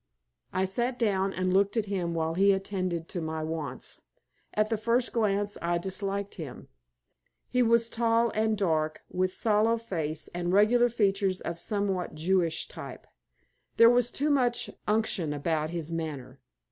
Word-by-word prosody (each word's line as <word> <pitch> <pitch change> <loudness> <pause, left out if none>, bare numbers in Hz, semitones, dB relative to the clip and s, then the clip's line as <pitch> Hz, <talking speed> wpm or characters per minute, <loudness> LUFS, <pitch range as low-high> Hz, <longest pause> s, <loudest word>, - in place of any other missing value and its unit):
I 185 +1 +1
sat 240 +6 -1
down 195 -5 +1
and 185 -1 -1
looked 200 +3 +2
at 220 - +1
him 180 -4 -2
while 160 0 0
he 195 +3 +4
attended 185 -4 -2
to 175 - -4
my 160 0 -3
wants. 155 -5 -5 0.5
At 215 +1 +1
the 225 - +2
first 235 +3 +1
glance 205 -2 0
I 170 0 +1
disliked 195 +2 -3
him. 140 -6 -9 0.8
He 250 - +3
was 230 -1 +4
tall 230 0 +2
and 220 0 +1
dark, 160 -5 0
with 185 0 0
sallow 220 +3 +2
face 160 -9 -3
and 175 0 -2
regular 235 +5 +5
features 195 -4 +1
of 170 0 -4
somewhat 195 -3 -2
Jewish 165 0 +1
type. - - -9 0.7
There 230 +1 +8
was 245 -1 +3
too 295 +4 0
much 245 -4 +1 0.2
unction 210 -7 0
about 155 +1 -1
his 170 -1 -4
manner. 140 -5 -5
195 Hz, 155 wpm, -28 LUFS, 170-220 Hz, 0.8 s, There